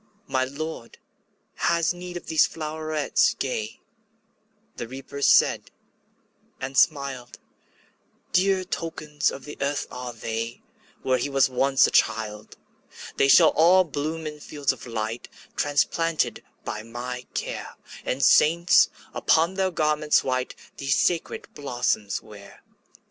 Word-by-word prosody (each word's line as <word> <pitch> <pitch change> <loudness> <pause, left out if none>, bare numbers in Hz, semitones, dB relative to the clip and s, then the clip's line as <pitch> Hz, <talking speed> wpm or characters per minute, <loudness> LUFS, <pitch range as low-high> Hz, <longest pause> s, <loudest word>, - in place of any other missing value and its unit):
``My 130 0 0
Lord 155 -3 -7 0.6
has 170 0 +2
need 175 0 -7
of - - -10
these 160 -1 +3
flowerets 155 -1 0
gay,'' 110 -5 -3 1.0
The 120 - -5
Reaper 135 +3 -8
said, - - +4 0.9
and 135 +1 -5
smiled; 135 -5 +1 1.0
``Dear 185 0 +2
tokens 155 -4 -2
of 135 - -8
the 150 - -9
earth 140 +1 -1
are 125 0 -6
they, 115 0 -5 0.4
Where 130 -1 +2
he 145 - -2
was 135 -1 +3
once 135 +1 +4
a - - 0
child. 105 -1 0 0.6
``They 135 - +3
shall 165 +2 +8
all 180 +4 +5
bloom 155 0 -4
in 150 -1 -6
fields 145 -1 -1
of - - -12
light, 115 0 -4 0.3
Transplanted 155 +3 0 0.2
by 105 - -4
my 125 +2 -7
care, - - -4 0.3
And 135 +2 -2
saints, 170 +6 +5 0.2
upon 165 +3 +2
their 190 -1 0
garments 150 -3 +2
white, 130 -1 -2 0.2
These 140 -1 +1
sacred 170 -2 0
blossoms 120 -7 -2
wear.'' 100 -2 -14
140 Hz, 125 wpm, -25 LUFS, 125-160 Hz, 1.0 s, shall